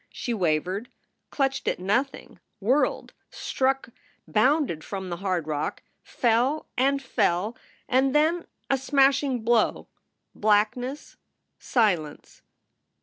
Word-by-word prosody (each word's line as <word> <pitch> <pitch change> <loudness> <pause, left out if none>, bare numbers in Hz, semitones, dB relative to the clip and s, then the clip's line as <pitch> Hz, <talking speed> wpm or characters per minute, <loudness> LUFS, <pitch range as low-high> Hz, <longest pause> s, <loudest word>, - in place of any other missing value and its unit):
She 240 - -4
wavered, 185 +3 -1 0.4
clutched 270 -1 -1
at - - +1
nothing, 240 +6 -2 0.2
whirled, 250 +9 +1 0.2
struck, 265 -1 -1 0.4
bounded 240 - +2
from 190 -2 -5
the 175 - -3
hard 185 -3 -1
rock, 150 -1 -3 0.2
fell 250 +6 +1
and 275 +2 +2
fell, 215 -5 0 0.3
and 265 +2 +2
then 325 +3 +2 0.2
a 270 - +1
smashing 270 -2 +2
blow, 230 -1 +1 0.4
blackness, 220 +6 0 0.4
silence. 180 - -1
240 Hz, 100 wpm, -26 LUFS, 195-270 Hz, 0.4 s, bounded